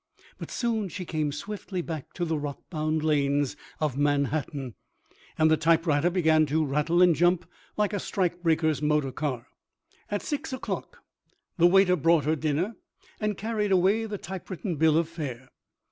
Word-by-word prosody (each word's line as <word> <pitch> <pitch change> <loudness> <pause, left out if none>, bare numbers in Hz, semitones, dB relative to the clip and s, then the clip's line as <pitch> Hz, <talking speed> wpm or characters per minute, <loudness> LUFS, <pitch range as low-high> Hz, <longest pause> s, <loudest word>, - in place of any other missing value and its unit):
But - - -7
soon 225 -5 -1
she 180 +2 -6
came 155 -3 -1
swiftly 190 +3 -5
back 160 -5 -6
to 175 - -2
the 160 -1 -1
rock 145 -1 -5
bound 155 -1 -1
lanes 145 -2 +1 0.2
of 150 -4 -1
Manhattan, 145 -2 0 0.6
and 155 0 +4
the 160 - +5
typewriter 165 -1 +3
began 160 -4 +3
to 155 +2 +1
rattle 150 +5 +2
and 175 -2 +6
jump 175 +1 +2 0.3
like 210 0 +1
a 205 - 0
strike 175 -2 -1
breaker's 160 -3 +1
motor 150 -2 +1
car. 130 -4 -3 0.6
At 205 - -2
6 290 -1 -3
o'clock 260 - -5 0.6
the 170 - +7
waiter 185 0 +5
brought 165 -2 +3
her 155 +1 +2
dinner 155 +8 -1 0.4
and 210 -2 -1
carried 210 -1 -1
away 195 +5 +3
the 210 -2 -4
typewritten 185 -1 -5
bill 160 +1 +4
of 165 -1 +2
fare. 135 -6 -7
160 Hz, 160 wpm, -27 LUFS, 150-185 Hz, 0.6 s, the